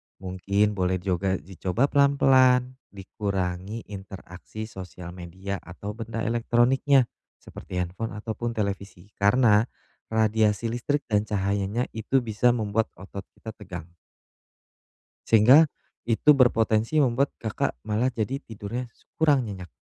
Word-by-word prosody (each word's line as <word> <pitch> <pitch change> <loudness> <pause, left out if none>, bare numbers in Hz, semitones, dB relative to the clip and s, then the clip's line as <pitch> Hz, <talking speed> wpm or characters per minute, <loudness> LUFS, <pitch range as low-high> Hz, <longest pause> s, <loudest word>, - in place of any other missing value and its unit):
mungkin 100 +3 0
boleh 95 -2 0
juga 95 +1 -1
dicoba 95 - -2
pelan-pelan, 130 -2 +4
dikurangi 95 +1 -4
interaksi 95 +1 -9
sosial 90 -4 -9
media 95 +2 -6
atau 95 +4 -8
benda 115 +1 -5
elektroniknya 120 +4 +3 0.3
seperti 90 -1 -5
handphone 100 +6 -5
ataupun 115 +2 -4
televisi. 100 -2 -4
Karena 105 +1 +4 0.4
radiasi 110 0 +1
listrik 145 +5 -1
dan 105 -1 0
cahayanya 100 +3 -1
itu 120 +4 0
bisa 120 +2 +2
membuat 110 0 0
otot 100 +1 -9
kita 110 - -8
tegang. 90 -6 -9 1.4
Sehingga 125 +9 +7 0.4
itu 120 +6 +4
berpotensi 115 +2 +3
membuat, 135 +1 +1
Kakak 110 -2 -2
malah 110 +5 +1
jadi 125 +5 -2
tidurnya 115 +3 -6
s - - -31
kurang 145 -6 +4
nyenyak. 90 -4 -7
110 Hz, 115 wpm, -26 LUFS, 95-120 Hz, 1.4 s, Sehingga